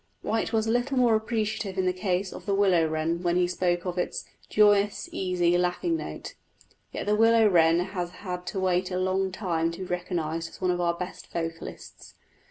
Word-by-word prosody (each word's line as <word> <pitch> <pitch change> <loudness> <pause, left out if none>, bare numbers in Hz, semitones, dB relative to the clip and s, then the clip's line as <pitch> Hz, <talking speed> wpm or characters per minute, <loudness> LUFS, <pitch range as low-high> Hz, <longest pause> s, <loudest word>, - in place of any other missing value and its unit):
White 225 0 -1
was 220 -2 +1
a 225 - 0
little 245 +3 0
more 245 -2 +4
appreciative 220 -3 -1
in 190 - +1
the 185 - +2
case 185 0 -1
of - - -10
the 200 - +2
willow 185 -5 +3
wren 160 +2 -1
when 175 -1 +1
he 180 0 +3
spoke 175 0 0
of 180 0 -2
its - - -3 0.2
"joyous, 205 -1 +3
easy, 180 -2 +1
laughing 180 - 0
note"; - - -6 0.6
yet - - -4
the 210 - +2
willow 225 0 +5
wren 165 -3 +4
has 180 -1 -3
had 180 -1 -7
to 195 - -3
wait 185 -1 +1
a 180 - -2
long 185 +1 0
time 170 -4 -1
to - - -8
be - - -3
recognised 170 -2 -3
as - - -14
one 185 -1 +1
of 180 0 -1
our 170 -1 +1
best 180 +1 -7
vocalists. 165 -1 -6
185 Hz, 200 wpm, -27 LUFS, 175-205 Hz, 0.6 s, willow